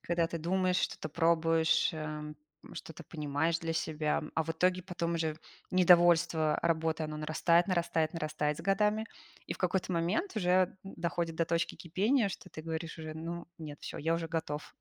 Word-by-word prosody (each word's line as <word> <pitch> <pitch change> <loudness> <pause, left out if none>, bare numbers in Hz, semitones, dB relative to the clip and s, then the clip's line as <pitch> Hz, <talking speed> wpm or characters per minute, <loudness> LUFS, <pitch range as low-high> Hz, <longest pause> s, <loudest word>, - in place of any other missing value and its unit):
когда 170 -1 +1
ты 165 - -4
думаешь, 185 +2 +1
что-то 155 - -2
пробуешь, 165 +2 +3
эм, 150 -1 -5 0.4
что-то 160 -5 -9
понимаешь 155 +1 -1
для 165 -1 -3
себя, 155 -1 0
м. 155 - -9
А 160 - +1
в 165 - -4
итоге 180 +3 +1
потом 170 -2 -2
уже 160 -2 -1 0.3
недовольство 175 -3 +5
работой, 160 -1 +1
оно 155 0 -5
нарастает 165 +3 +3
нарастает 170 -3 0
нарастает 150 -2 -1
с - - -7
годами. 210 +2 +2 0.4
И - - -2
в - - -10
какой-то 185 0 0
момент 185 - 0
уже 185 -1 +3 0.2
д 195 - -9
доходит 170 -1 -1
до 165 - +2
точки 165 +1 0
кипения, 205 - +1
что - - -8
ты 155 - -9
говоришь 165 +1 -4
уже: 155 -1 -6
"Ну, 170 +2 -5
нет, 150 -2 -8
всё, - - -6
я 165 +2 +1
уже 165 -1 -3
готов 160 -3 -4
165 Hz, 180 wpm, -32 LUFS, 160-180 Hz, 0.4 s, недовольство